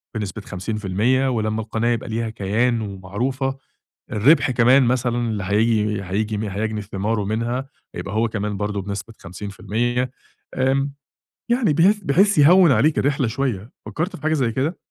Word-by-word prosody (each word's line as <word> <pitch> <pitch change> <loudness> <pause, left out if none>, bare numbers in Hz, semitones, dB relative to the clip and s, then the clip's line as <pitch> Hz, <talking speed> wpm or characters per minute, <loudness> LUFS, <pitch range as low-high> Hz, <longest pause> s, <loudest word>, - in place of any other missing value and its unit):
بنسبة 105 -1 -4
50% 105 +7 0
ولمّا 110 -2 -1
القناة 110 +2 -1
يبقى 115 0 -2
ليها 115 +1 -2
كيان 110 +3 0
ومعروفة، 115 +8 -3 0.5
الربح 130 +6 +4
كمان 125 +2 +5
مثلًا 120 -1 +1
اللي 110 -4 -2
هييجي 105 0 +1
هييجي 105 +2 -2
هيجني 105 +2 -2
ثماره 105 +2 -2
منها 120 +5 -2 0.3
هيبقى 100 +2 -5
هو 115 +1 +2
كمان 105 -1 -3
برضه 105 0 -2
بنسبة 100 +2 -6
50% 105 +7 -3 0.5
إمم، 135 +2 +1 0.6
يعني 240 - +2
بحيث 190 +7 +4
بحيث 190 +7 +3
يهوّن 170 +3 +7
عليك 135 +6 +3
الرحلة 140 -2 +1
شوية. 115 -3 -3
فكرت 170 +5 -3
في - - -12
حاجة 155 - +2
زي 130 -7 +1
كده؟ 140 +9 -1
115 Hz, 145 wpm, -22 LUFS, 105-135 Hz, 0.6 s, يهوّن